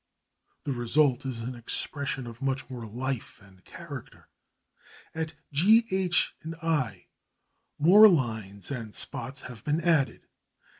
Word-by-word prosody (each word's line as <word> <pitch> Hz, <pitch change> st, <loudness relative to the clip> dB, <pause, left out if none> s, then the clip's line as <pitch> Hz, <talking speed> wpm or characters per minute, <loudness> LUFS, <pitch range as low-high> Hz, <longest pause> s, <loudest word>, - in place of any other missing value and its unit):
The 140 Hz, -, -2 dB
result 130 Hz, +2 st, +2 dB
is 120 Hz, -3 st, -4 dB
an 125 Hz, +3 st, -4 dB
expression 135 Hz, +2 st, -3 dB
of 120 Hz, +1 st, -10 dB
much 135 Hz, 0 st, -2 dB
more 120 Hz, -3 st, -6 dB
life 125 Hz, +2 st, -4 dB
and 95 Hz, -2 st, -20 dB
character. -, -, -10 dB, 0.8 s
At 160 Hz, -1 st, -4 dB, 0.2 s
G, 210 Hz, +11 st, +5 dB
H, 185 Hz, -2 st, +2 dB, 0.3 s
I 130 Hz, -, -1 dB, 0.7 s
more 200 Hz, +8 st, +9 dB
lines 110 Hz, -, -1 dB
and 115 Hz, -6 st, -5 dB
spots 135 Hz, +2 st, -5 dB
have 125 Hz, -4 st, -10 dB
been 150 Hz, +2 st, +1 dB
added. 160 Hz, -6 st, +1 dB
135 Hz, 120 wpm, -28 LUFS, 115-160 Hz, 0.8 s, more